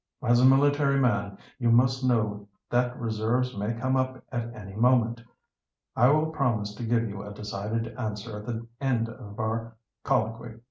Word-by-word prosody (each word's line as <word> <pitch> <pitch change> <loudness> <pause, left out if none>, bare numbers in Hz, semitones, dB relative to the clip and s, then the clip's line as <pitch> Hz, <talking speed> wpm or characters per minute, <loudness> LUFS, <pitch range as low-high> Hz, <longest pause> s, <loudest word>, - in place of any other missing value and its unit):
"As 120 +1 +4
a - - +6
military 140 +1 +4
man, 100 -6 +1 0.2
you 120 -2 +2
must 130 +2 +4
know 105 -5 0 0.2
that 125 0 +1
reserves 115 +3 0
may 105 +3 -2
come 130 +3 0
up 130 0 -1
at 120 -2 -3
any 100 -3 -9
moment. 115 0 +2 0.7
I 125 - +5
will 155 +3 +3
promise 115 -9 0
to 110 - -7
give 115 0 +1
you 100 -1 -6
a 105 - -8
decided 105 +2 -4
answer 105 -2 -4
at 105 - -11
the 115 -1 -4 0.2
end 120 -4 +1
of 110 -2 -10
our 115 +1 -2 0.3
colloquy. 115 -3 -1
115 Hz, 170 wpm, -27 LUFS, 110-125 Hz, 0.7 s, a